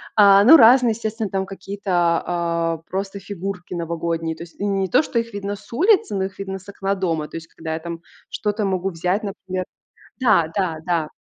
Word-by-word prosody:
А, 200 Hz, -1 st, +7 dB
ну, 300 Hz, +7 st, +10 dB
разные, 245 Hz, 0 st, +7 dB
естественно, 220 Hz, -1 st, -3 dB
там 190 Hz, 0 st, -1 dB
какие-то, 195 Hz, +1 st, -6 dB
а, 170 Hz, -1 st, +1 dB
просто 195 Hz, +1 st, -4 dB
фигурки 195 Hz, -2 st, -6 dB
новогодние. 165 Hz, -1 st, -2 dB
То 165 Hz, -, -7 dB
есть 170 Hz, -, -16 dB
не 195 Hz, -1 st, 0 dB
то, 255 Hz, -, +4 dB
что 240 Hz, -, -1 dB
их 230 Hz, -1 st, -5 dB
видно 200 Hz, 0 st, -4 dB
с -, -, -18 dB
улицы, 365 Hz, -, +3 dB
но 190 Hz, -, 0 dB
их 195 Hz, +1 st, -9 dB
видно 195 Hz, -1 st, -4 dB
с 190 Hz, -, -15 dB
окна 195 Hz, 0 st, -2 dB
дома. 165 Hz, -5 st, -1 dB
То -, -, -11 dB
есть 165 Hz, 0 st, -9 dB
когда 160 Hz, -1 st, -6 dB
я 160 Hz, -, -3 dB
там 170 Hz, 0 st, -7 dB, 0.3 s
что-то 210 Hz, 0 st, -2 dB
могу 190 Hz, -1 st, -1 dB
взять, 180 Hz, +5 st, -1 dB
например 185 Hz, -2 st, -4 dB, 0.6 s
Да, 205 Hz, -10 st, +4 dB
да, 185 Hz, -5 st, 0 dB
да. 165 Hz, -3 st, 0 dB
195 Hz, 200 wpm, -21 LUFS, 170-205 Hz, 0.6 s, ну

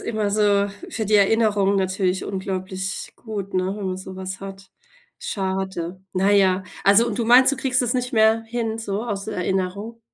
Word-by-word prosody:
immer 215 Hz, -3 st, -2 dB
so 205 Hz, -1 st, +2 dB, 0.2 s
für 220 Hz, -2 st, -3 dB
die 210 Hz, -, +1 dB
Erinnerungen 205 Hz, -1 st, +3 dB
natürlich 190 Hz, -1 st, 0 dB
unglaublich 190 Hz, 0 st, -4 dB
gut, 205 Hz, -4 st, -6 dB
ne, 185 Hz, +1 st, 0 dB
wenn 205 Hz, -2 st, -5 dB
man 185 Hz, 0 st, -2 dB
so 190 Hz, 0 st, -9 dB
was 190 Hz, 0 st, -6 dB
hat. 195 Hz, 0 st, -10 dB, 0.5 s
Schade. 190 Hz, -2 st, -3 dB
Na 190 Hz, +2 st, +2 dB
ja, 190 Hz, -2 st, +3 dB, 0.2 s
also, 200 Hz, +4 st, +6 dB
und 225 Hz, -3 st, -3 dB
du 235 Hz, -, 0 dB
meinst, 250 Hz, +3 st, +7 dB
du -, -, -1 dB
kriegst 260 Hz, -1 st, +1 dB
es 245 Hz, -1 st, 0 dB
nicht 250 Hz, 0 st, -2 dB
mehr 220 Hz, 0 st, +4 dB
hin 225 Hz, -1 st, -3 dB
so 210 Hz, -2 st, -3 dB
aus 205 Hz, -4 st, -4 dB
der -, -, -5 dB
Erinnerung? 190 Hz, +5 st, -2 dB
200 Hz, 185 wpm, -22 LUFS, 190-220 Hz, 0.5 s, meinst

